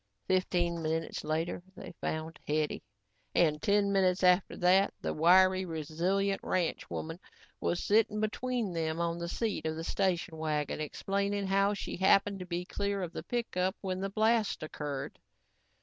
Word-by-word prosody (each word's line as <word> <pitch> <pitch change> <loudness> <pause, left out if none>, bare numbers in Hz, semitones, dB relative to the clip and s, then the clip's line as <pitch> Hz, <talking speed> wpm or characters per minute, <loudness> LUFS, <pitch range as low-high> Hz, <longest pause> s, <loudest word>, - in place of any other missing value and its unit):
Fifteen 175 -2 +1
minutes 160 +1 -2
later 160 +3 -1
they - - -9
found 160 +1 -3
Hetty 150 0 0 0.5
and 150 -3 +3
ten 200 0 +3
minutes 190 -1 +2
after 180 +1 +4
that, 185 +2 +4
the - - -2
wiry, 185 +3 +5
resilient 175 +4 -1
ranchwoman 165 -1 -2 0.4
was 175 - -1
sitting 210 0 +3
between 225 -1 -1
them 160 -1 -1
on 170 0 -1
the 170 0 -4
seat 210 -6 -2
of 160 - -2
the 165 - -5
station 180 -2 -1
wagon, 150 -1 -1
explaining 200 +6 -1
how 195 +1 +2
she - - -5
happened 195 +1 +3
to 180 - -7
be 175 0 -3
clear 200 0 -2
of 175 - -5
the - - -4
pickup 190 -6 -1
when 185 -2 -2
the 195 - -1
blast 220 -2 +1
occurred. 145 -3 -5
180 Hz, 150 wpm, -31 LUFS, 160-200 Hz, 0.5 s, wiry